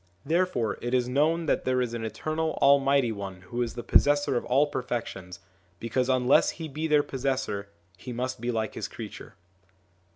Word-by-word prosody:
Therefore 160 - 0
it 120 +1 -1
is 125 -1 +1
known 155 +6 +1
that - - +1
there 130 0 +1
is 125 -2 -1
an 115 -1 -4
Eternal 155 +9 -2
Almighty 140 -3 +4
One 100 -3 -6
who 120 +7 -4
is 120 -2 -2
the 120 - -5
possessor 145 +2 +3
of 120 - 0
all 135 +4 +3
perfections; 115 -10 -5 0.4
because 125 +3 -1
unless 130 +1 +4
He 165 -1 -5
be 155 +2 -3
their 150 -1 +4
possessor, 130 -8 -2 0.3
He 125 - -8
must 125 0 -3
be 120 - -2
like 110 -3 -1
His - - -4
creature. - - -9
125 Hz, 175 wpm, -27 LUFS, 115-145 Hz, 0.4 s, Almighty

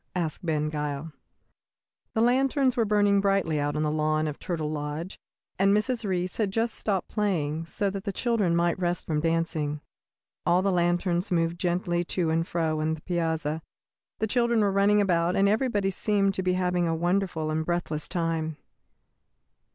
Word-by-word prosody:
asked 170 0 -2
Ben 155 -3 0
Gile. 150 0 -4 1.0
The 220 - +2
lanterns 260 +2 +3
were 230 - +2
burning 205 -1 +3
brightly 195 -6 +1
out 145 0 -1
on 150 - 0
the 150 - +1
lawn 155 0 +1
of 150 - -5
Turtle 160 -4 -3
Lodge, 150 +4 -5 0.4
and 195 +2 +4
Mrs. 235 +2 -1
Reece 185 -2 -1
had 215 -3 +1
just 225 +3 0
stopped 195 -4 -2
playing 165 -6 -1
so 200 +3 -1
that 195 -1 -5
the 200 - -1
children 205 -5 +1
might 170 +1 +1
rest 175 -1 -1
from 155 -2 0
dancing. 160 -2 -1 0.6
All 180 +2 +3
the 195 - +2
lanterns 175 +1 +1
moved 165 0 +1
gently 175 -1 0
to 170 -2 0
and 165 +1 0
fro 160 -2 -1
on 160 +1 0
the 155 - -14
piazza; 160 -3 -1 0.6
the 220 - 0
children 235 0 +2
were 200 -1 +2
running 200 +1 +4
about, 175 -2 +2
and 195 - +4
everybody 210 -3 +1
seemed 195 0 +1
to 190 - -1
be 185 0 +1
having 180 -1 +1
a 165 0 0
beautiful 175 -2 0
and 160 +1 0
breathless 165 -2 -2
time. 165 -3 -1
175 Hz, 175 wpm, -27 LUFS, 160-200 Hz, 1.0 s, and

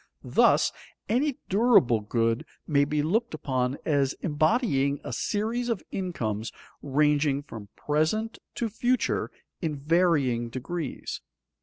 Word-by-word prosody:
Thus, - - +4 0.4
any 260 +4 +1
durable 195 - +4
good 115 +2 0 0.2
may 145 -1 +3
be 150 0 0
looked 220 +5 0
upon 130 -2 -1
as 140 -3 +2
embodying 150 - +1
a - - -5
series 230 +4 -1
of 225 -6 -1
incomes 115 - -3 0.3
ranging 145 0 +2
from 110 -7 -9
present 160 +10 0 0.2
to 235 - -1
future 240 +4 0 0.3
in 160 -4 -1
varying 145 -6 +2
degrees. 140 +5 -5
150 Hz, 115 wpm, -27 LUFS, 135-205 Hz, 0.4 s, Thus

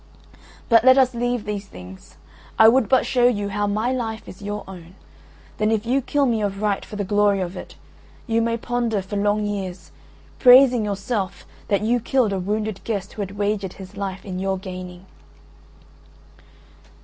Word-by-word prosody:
"But 230 -2 +5
let 260 +1 +7
us 260 -2 +4
leave 240 -1 -2
these 205 -1 -4
things. 90 - -13 0.4
I 220 - +8
would 240 0 +4
but 260 - +3
show 245 -1 +3
you 205 -4 0
how 205 +1 -1
my 215 +5 0
life 230 -3 -4
is 185 - -11
your 205 +1 -5
own. 180 -2 -11 0.6
Then 215 0 +2
if 220 0 0
you 260 +4 +1
kill 285 +2 0
me 230 -4 0
of 200 -1 -2
right 205 -2 0
for - - -10
the 205 - -2
glory 205 0 +2
of 180 0 -4
it, - - -9 0.5
you 230 0 +1
may 230 0 0
ponder 235 -4 -2
for 200 +2 -7
long 205 +1 +1
years, 195 -3 -5 0.5
praising 250 -2 +7
yourself 200 -2 -3 0.2
that 200 -1 +1
you 240 +3 +2
killed 235 -3 +1
a 195 - -1
wounded 210 +2 -3
guest 200 -3 -4
who 210 - -6
had 200 0 -6
wagered 205 -2 -1
his 190 +1 -12
life 195 -1 -5
in 185 -2 -5
your 190 0 -1
gaining." 185 -1 -8
205 Hz, 180 wpm, -22 LUFS, 195-230 Hz, 0.6 s, I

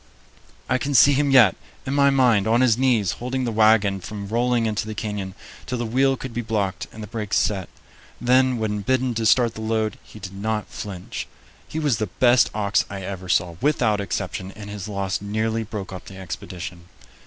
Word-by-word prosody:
I 130 - +1
can 140 +1 -2
see 145 +3 +7
him 140 +1 +2
yet, 125 -8 +6 0.3
in 135 - -2
my 140 0 +5
mind, 125 -7 +3
on 115 +2 +3
his 125 -4 +4
knees, 120 -7 +2
holding 130 +2 -3
the 120 - -1
wagon 110 -3 +4
from 100 +1 -6
rolling 120 +1 +1
into 110 -1 -1
the 110 - -5
canyon 100 -3 -4 0.3
till 125 - -2
the 120 - -2
wheel 135 +4 +2
could 130 -2 -7
be 120 - -2
blocked 105 -4 -2
and 110 - -9
the - - -7
brakes 105 -1 -2
set. 95 -4 0 0.5
Then, 130 +1 +3
when 105 -2 -2
bidden 130 +3 +1
to 115 -1 0
start 120 0 +4
the 110 - -8
load, 110 -1 -1
he - - -15
did 95 -2 -8
not 105 +2 -2
flinch. 95 -4 -6 0.4
He - - -6
was 145 -7 +1
the 110 - -1
best 120 +6 +4
ox 100 -2 +2
I 95 -1 -6
ever 95 -1 -6
saw, 85 -2 +1
without 120 -8 +2
exception, 95 -1 -4
and 105 -1 -9
his 105 -1 -6
loss 100 -2 -2
nearly 110 +2 -1
broke 105 -3 -6
up 95 - -8
the 95 - -11
expedition. 90 -1 -7
110 Hz, 200 wpm, -23 LUFS, 100-125 Hz, 0.5 s, see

